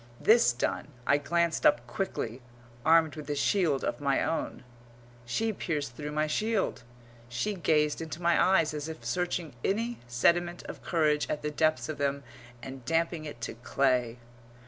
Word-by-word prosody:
This 220 - +5
done, 120 - -2 0.2
I 145 - +4
glanced 170 +3 0
up 120 -4 +4
quickly, 120 -2 -3 0.4
armed 160 0 +4
with 150 -2 -8
a 145 - 0
shield 155 -2 +2
of - - -2
my 140 -1 +2
own. 160 -4 -2 0.6
She 220 - 0
pierced 145 - -3
through 150 +1 -5
my 155 +1 +1
shield; 215 - 0 0.5
she 125 - -1
gazed 155 -4 +1
into 160 0 -6
my 170 -1 +3
eyes 165 -5 +3
as 150 +1 -4
if 160 - -8
searching 175 -3 -2
any 230 +4 -1
sediment 175 +8 +2
of - - -8
courage 155 -3 +1
at 150 - -2
the 150 - -1
depths 155 -5 +1
of 155 -3 -5
them 140 0 0 0.4
and 130 0 -8
damping 165 +2 0
it 145 -6 -8
to - - -4
clay. 125 0 0
155 Hz, 165 wpm, -29 LUFS, 140-170 Hz, 0.6 s, This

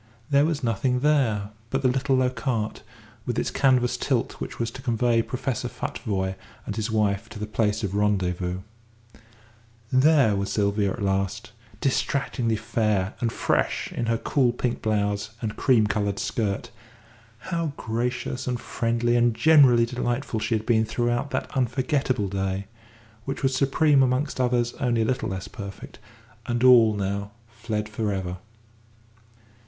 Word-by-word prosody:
There 140 +1 +5
was 155 -3 -1
nothing 125 +3 0
there 120 -9 +2 0.2
but 135 +2 -1
the - - +5
little 135 +2 +1
low 130 -1 +2
cart, 120 -5 -2 0.5
with 120 - -1
its - - 0
canvas 125 -2 +2
tilt 125 -1 -1
which - - -5
was 115 -1 -2
to 130 - -9
convey 120 -2 +2
Professor 125 0 -3
Futvoye 95 -2 -3 0.3
and 105 - -4
his 110 0 -2
wife 105 0 0
to 110 - -9
the 105 - -3
place 105 0 0
of 100 -2 -2
rendezvous. 95 -3 0 1.3
There 135 -5 +5
was 100 0 -2
Sylvia 100 -1 +1
at 110 - -5
last, 100 +4 -1 0.3
distractingly 130 -3 0
fair 105 -2 0
and 115 -1 0
fresh - - 0
in 120 - -3
her 115 0 +2
cool 130 0 +2
pink 120 0 -2
blouse 105 -1 0
and 110 -3 -4
cream 120 -6 +3
coloured 100 -2 -1
skirt; 110 +2 -2 0.7
how 165 +1 -3
gracious 120 +3 -3
and 125 -1 -1
friendly 120 +1 0
and 120 -1 +3
generally 125 -3 +6
delightful 120 0 -2
she 110 +2 0
had 110 0 -3
been 110 -2 +3
throughout 120 +4 -1
that 130 -2 -4
unforgettable 130 -2 0
day, 95 0 -2 0.6
which 135 +1 -4
was 135 -1 +2
supreme 140 +1 +3
amongst 130 +1 +1
others 120 -1 +1
only 120 -4 +1
a - - 0
little 125 +3 -1
less 95 -1 -5
perfect, 100 -1 -9 0.5
and 120 +1 -1
all 115 -4 +7
now 100 0 -2 0.2
fled 110 -2 -4
for 110 0 -2
ever! 95 -2 -3
115 Hz, 150 wpm, -25 LUFS, 105-130 Hz, 1.3 s, all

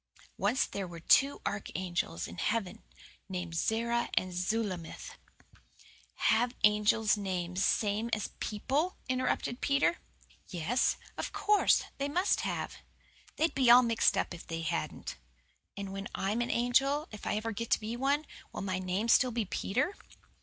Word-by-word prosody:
Once 210 +7 +2
there 195 -2 -5
were 170 -1 -9
two 275 +11 +4
archangels 180 - -3
in 85 - -9
heaven, 220 -5 -1 0.5
named 180 -3 -4
Zerah 235 +7 0
and 185 -1 0
Zulamith 185 -2 -3 0.6
" - - -26 0.2
"Have 240 +3 +2
angels 210 +1 +4
names 185 -2 -2
same 210 +3 +1
as 215 -3 -1
people?" 280 - -1
interrupted 255 -1 -1
Peter. 280 +4 +2 0.5
"Yes, 195 +8 +1 0.2
of - - -3
course. 420 0 +3 0.2
They 280 +1 -1
MUST 360 +6 +2
have. - - -3 0.6
They'd 325 +1 +1
be 260 -3 +3
all 245 +1 +9
mixed 230 -3 +3
up - - -1
if 175 - -10
they 165 0 -4
hadn't." 155 - -3 0.6
"And 195 -1 -5
when 195 0 -5
I'm 210 +5 0
an 240 - -1
angel 270 +5 +2
if 210 - -8
I - - +1
ever 220 +2 -2
get 230 +2 -4
to - - +3
be 220 +2 -4
one 280 +4 +1 0.3
will - - -5
my 185 -1 -1
name 185 +4 -1
still 255 +2 +5
be 230 -2 -1
Peter?" 250 - -1
220 Hz, 155 wpm, -31 LUFS, 190-245 Hz, 0.6 s, all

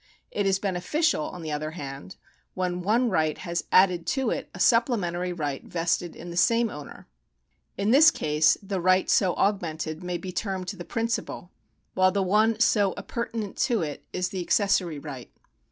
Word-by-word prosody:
It 205 -1 0
is 190 -1 +3
beneficial, 195 - 0
on 175 - -7
the 155 - -4
other 150 +1 -2
hand, 140 +4 -7 0.4
when 180 -1 -2
one 225 +5 +2
right 155 -4 +1
has 170 -2 -3
added 180 -3 +4
to 265 +4 0
it - - -4
a - - -11
supplementary 185 -7 +2
right 145 -5 -3
vested 170 0 -2
in 175 +1 -9
the 170 - -6
same 230 +3 +3
owner. 145 -1 -10 0.7
In 200 +2 +1
this 305 +5 +8
case 150 - +2
the 195 -2 -3
right 185 +1 +3
so 185 -3 +3
augmented 165 -5 -1
may 180 0 -2
be 185 +1 -7
termed 190 0 -3
fhe 180 -2 -7
principal, 230 -5 -3 0.4
w 185 - -3
hile 185 0 +6
the 200 - +2
one 215 +4 +2
so 205 -4 +3
appurtenant 225 0 -4
to 230 -8 +1
it 150 -2 -5
is 180 0 -2
the 190 -2 -4
accessory 180 -3 +1
right. 140 -4 -8
185 Hz, 175 wpm, -26 LUFS, 170-210 Hz, 0.7 s, this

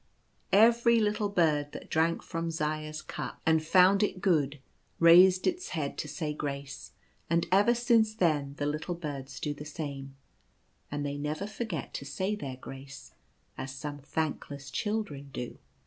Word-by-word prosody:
Every 235 +2 +6
little 210 -1 +1
bird 155 -6 +1
that - - -9
drank 165 +1 +1
from 165 0 -3
Zaya's 155 -1 -3
cup - - -6
and 160 -1 +3
found 185 +4 +5
it 200 -3 0
good 150 -6 +1 0.4
raised 180 +2 +7
its 365 0 -1
head 140 -3 -2
tp 150 - -5
say 150 +1 -3
grace; 140 -2 -6 0.4
and 170 +1 +2
ever 205 +6 +5
since 230 -3 +3
then 150 -8 +1
the 145 - -1
little 155 +4 -2
birds 140 -5 -6
do 150 - -2
the 145 - -9
same, 140 -3 -6 0.7
and 145 0 -3
they 145 0 -3
never 150 +6 -3
forget 210 - -5
to 140 - -5
say 185 +9 -2
their 135 -10 -6
grace— 135 - -10 0.5
as 130 0 -5
some 145 +1 -6
thankless 145 -1 -4
children 205 -9 -3
do. 125 -2 -6
155 Hz, 155 wpm, -30 LUFS, 145-190 Hz, 0.7 s, raised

